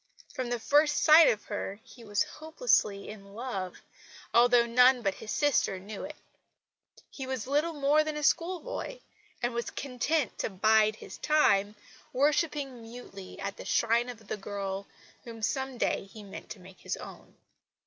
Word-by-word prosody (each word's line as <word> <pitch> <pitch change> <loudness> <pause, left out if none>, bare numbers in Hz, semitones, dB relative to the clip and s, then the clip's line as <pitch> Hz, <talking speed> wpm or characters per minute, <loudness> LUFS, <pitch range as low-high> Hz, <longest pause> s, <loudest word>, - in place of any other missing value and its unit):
From 255 -2 -3
the 240 -1 -1
first 295 +5 +3
sight 315 +1 +8
of 210 - -1
her 205 -1 -5
he 240 - -15
was 205 -2 +1
hopelessly 315 - 0
in 200 -1 -11
love, 205 -7 -5 0.5
although 240 0 +6
none 250 +1 +5
but 195 -2 +1
his 215 - -10
sister 285 -9 +1
knew 200 +2 -8
it. 300 +1 -7 1.0
He 265 -2 -7
was 260 -4 -3
little 295 +5 +1
more 295 +2 +3
than 305 -1 -4
a 300 - -4
school 345 +4 +1
boy, - - -6 0.4
and 240 0 0
was 235 0 -2
content 275 +2 -2
to - - -1
"bide 215 +2 +3
his - - -11
time," 210 -10 +3 0.4
worshipping 280 -2 0
mutely 225 -5 -10
at 200 0 -4
the - - -8
shrine 235 +2 +2
of 225 -3 -10
the - - -3
girl 195 -1 -5 0.4
whom 225 -2 -9
some 265 +2 -1
day 195 - 0
he 210 +2 -12
meant 195 - -10
to 205 - -8
make 185 +1 -15
his - - -4
own. - - -11
240 Hz, 170 wpm, -29 LUFS, 205-290 Hz, 1.0 s, sight